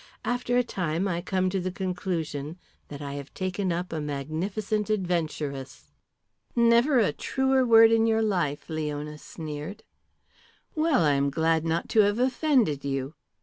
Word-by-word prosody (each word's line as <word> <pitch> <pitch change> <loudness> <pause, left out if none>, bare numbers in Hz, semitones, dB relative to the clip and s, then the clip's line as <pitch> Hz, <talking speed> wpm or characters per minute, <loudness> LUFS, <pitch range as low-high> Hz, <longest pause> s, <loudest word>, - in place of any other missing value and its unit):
After 245 0 0
a 250 - +4
time 180 -4 -2
I 170 -2 -1
come 185 0 0
to 195 - 0
the 185 0 -2
conclusion 175 -5 -3 0.3
that 145 0 -8
I 140 -1 -5
have 140 -1 -8
taken 185 0 -2
up 175 +1 -3
a 155 - -2
magnificent 180 +9 -2
adventuress." 160 -9 -3 0.6
"Never 235 +4 +4
a 205 -10 +3
truer 265 0 +1
word 225 -1 +7
in 225 0 +4
your 225 0 +2
life," 175 -9 -1
Leona 150 -1 -4
sneered. 155 +5 -7 0.9
"Well, 310 - +2
I 145 - +4
am 140 0 +1
glad 160 +2 +1
not 165 +1 -1
to 220 - +2
have 205 0 +4
offended 250 - +2
you. 135 0 -3
180 Hz, 150 wpm, -27 LUFS, 150-220 Hz, 0.9 s, word